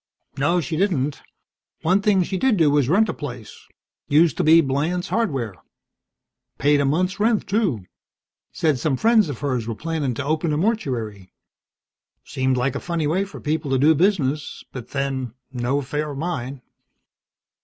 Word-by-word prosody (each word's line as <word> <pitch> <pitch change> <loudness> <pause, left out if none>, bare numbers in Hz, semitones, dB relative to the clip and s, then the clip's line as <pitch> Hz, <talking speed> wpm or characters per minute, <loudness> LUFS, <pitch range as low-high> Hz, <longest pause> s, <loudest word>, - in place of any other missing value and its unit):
"No, 145 +6 +2
she 160 0 -3
didn't. 150 -7 0 0.6
One 185 +5 +3
thing 195 -2 +3
she 190 - -4
did 235 +2 +2
do 155 -4 +4
was 145 -3 +2
rent 210 +7 +4
a - - -2
place. 125 -7 -9 0.4
Used 155 +1 +4
to - - +1
be 160 +2 +7
Blands 160 +5 0
Hardware. 135 - -1 1.0
Paid 145 0 +3
a - - +1
month's 180 +8 0
rent, 220 0 +2
too. 190 - 0 0.7
Said 155 -5 0
some 135 +1 0
friends 220 - +4
of 140 - -4
hers 125 -6 -1
were 115 - -3
plannin' 155 -3 -2
to 140 - -4
open 155 +1 0
a - - 0
mortuary. 125 - -2 0.9
Seemed 130 0 0
like 125 +1 0
a - - -1
funny 170 -3 -2
way 180 +7 +1
for 195 - -10
people 150 -1 -2
to 135 - +2
do 150 +5 +5
business, 155 -4 0
but 125 -3 -8
then, 135 -4 -3 0.2
no 125 +2 0
affair 150 +2 -2
of 140 - -6
mine." 140 -5 -4
150 Hz, 165 wpm, -22 LUFS, 130-180 Hz, 1.0 s, be